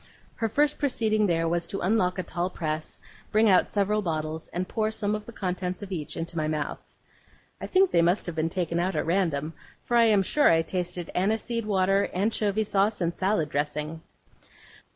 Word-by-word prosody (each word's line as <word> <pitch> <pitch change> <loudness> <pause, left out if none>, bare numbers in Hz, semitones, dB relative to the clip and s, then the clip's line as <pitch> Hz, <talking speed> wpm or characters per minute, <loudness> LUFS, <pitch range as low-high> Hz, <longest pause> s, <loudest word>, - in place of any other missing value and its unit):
Her 225 - 0
first 295 +5 +1
proceeding 220 -6 +1
there 165 -2 +1
was 170 +1 0
to 195 - -4
unlock 185 -2 +1
a 185 - -1
tall 175 +1 -2
press, 155 -3 -4 0.3
bring 220 +1 +4
out 185 -3 +4
several 210 +1 +1
bottles, 155 -3 -3
and 180 +1 -3
pour 215 -1 0
some 210 -1 -2
of 210 0 -4
the - - -7
contents 180 -2 -3
of 200 - -8
each 155 -4 -4
into 170 +1 -5
my 155 -2 0
mouth. 155 -1 -2 0.8
I - - -4
think 380 0 +3
they 170 - +4
must 175 +4 +2
have 175 - -4
been 160 0 -1
taken 170 -1 -1
out 180 +1 0
at 150 - 0
random, 165 -4 0 0.3
for 240 - -1
I 235 -1 +6
am 210 -3 +4
sure 295 +9 +3
I 165 0 +4
tasted 180 -1 -4
aniseed 220 +4 -1
water, 195 0 +2
anchovy 210 +1 +1
sauce, 205 +1 +1
and 170 -1 -1
salad 185 -5 0
dressing. 150 +2 -3
185 Hz, 195 wpm, -27 LUFS, 165-215 Hz, 0.8 s, I